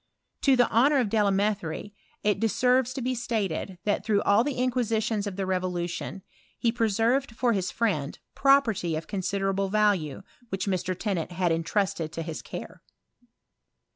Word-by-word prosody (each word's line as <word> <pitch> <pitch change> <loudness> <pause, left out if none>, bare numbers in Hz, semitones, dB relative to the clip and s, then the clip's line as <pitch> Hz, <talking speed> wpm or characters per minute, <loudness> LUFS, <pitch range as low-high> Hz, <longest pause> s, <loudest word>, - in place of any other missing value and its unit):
To 270 -2 +5
the 245 -1 +4
honour 275 +6 +4
of 245 -6 +1
Delame 205 -1 +2
therie, 170 +4 -6 0.3
it 210 -1 +2
deserves 250 +3 +2
to 265 - -3
be 255 +1 0
stated, 205 -6 -2
that 205 - 0
through 210 -2 +1
all 205 +3 +4
the 290 -1 -2
inquisitions 230 -4 0
of 200 - -4
the 195 0 -2
revolution, 180 0 -3 0.3
he 230 - +1
preserved 230 +3 +1
for 240 0 +2
his 190 -3 -1
friend 180 -11 -1 0.2
property 240 - +3
of 155 - -4
considerable 195 0 -1
value, 195 -7 +1 0.3
which 190 0 -2
Mr. 185 -2 -1
Tennant 185 -5 -2
had 175 -1 +1
intrusted 165 -1 -1
to 165 - -3
his 160 -1 -5
care. - - -8
205 Hz, 155 wpm, -27 LUFS, 185-230 Hz, 0.3 s, To